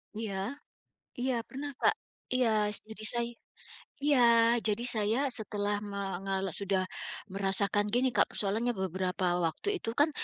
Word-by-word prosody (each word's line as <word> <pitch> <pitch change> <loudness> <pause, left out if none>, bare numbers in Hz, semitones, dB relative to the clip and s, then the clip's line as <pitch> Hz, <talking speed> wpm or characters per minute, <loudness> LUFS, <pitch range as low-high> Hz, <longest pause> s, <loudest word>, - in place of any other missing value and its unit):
Iya. 215 +4 -4 0.6
Iya, 255 +1 0
pernah 285 +2 -6
Kak, - - +5 0.4
iya 250 -2 +3 0.3
s - - -4
jadi 220 0 -8
say 235 0 0 0.8
iya, 235 -5 +5
jadi 220 +2 +4
saya 220 0 +3 0.2
setelah 205 -1 -2
mengalo 195 -1 -3
sudah 195 -2 0 0.5
merasakan 200 +1 +2
gini 250 +3 +2
Kak, - - +3
persoalannya 220 +4 0
beberapa 185 -1 -2 0.2
waktu 165 - -2
itu 225 - -2
kan, 295 +4 +3
210 Hz, 130 wpm, -30 LUFS, 195-240 Hz, 0.8 s, Kak